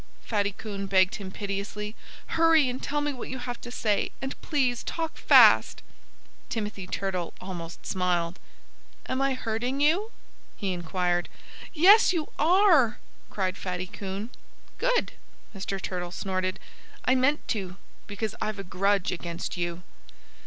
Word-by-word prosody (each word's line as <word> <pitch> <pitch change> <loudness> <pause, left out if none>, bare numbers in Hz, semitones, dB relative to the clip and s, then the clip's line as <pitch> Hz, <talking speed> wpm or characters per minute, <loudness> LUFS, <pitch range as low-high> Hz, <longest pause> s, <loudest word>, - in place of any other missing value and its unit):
Fatty 205 -2 0
Coon 200 -1 -6
begged 185 -1 +3
him 195 -2 -7
piteously. 205 +2 -4 0.3
"Hurry 325 -3 +5
and 250 +1 -3
tell 295 +1 -1
me 295 0 -1
what 250 - -7
you 260 - -4
have 245 -1 -6
to 240 - -8
say. 215 -4 0
And 270 0 -5
please 255 -6 +1
talk 325 -1 -3
fast!" - - +6 0.7
Timothy 210 -5 -4
Turtle 185 -3 -3
almost 175 -3 -7
smiled. 180 -1 0 0.7
"Am 260 +1 -1
I 275 -1 +2
hurting 245 +3 -2
you?" 335 +9 +3 0.5
he 195 -2 -2
inquired. 175 0 -1 0.4
"Yes, 380 +6 +7
you 320 -4 -2
are!" 320 - +5 0.3
cried 190 -1 -2
Fatty 180 -1 -3
Coon. 200 +3 -6 0.5
"Good!" - - +1 0.4
Mr. 195 0 -3
Turtle 180 -2 -4
snorted. 185 0 -2 0.5
"I 255 - +4
meant 265 +3 +2
to, 190 -5 -3 0.3
because 210 +1 -3
I've 215 -1 -2
a 195 - -5
grudge 195 +1 +1
against 170 -1 -4
you." 175 0 -3
205 Hz, 140 wpm, -27 LUFS, 185-265 Hz, 0.7 s, Yes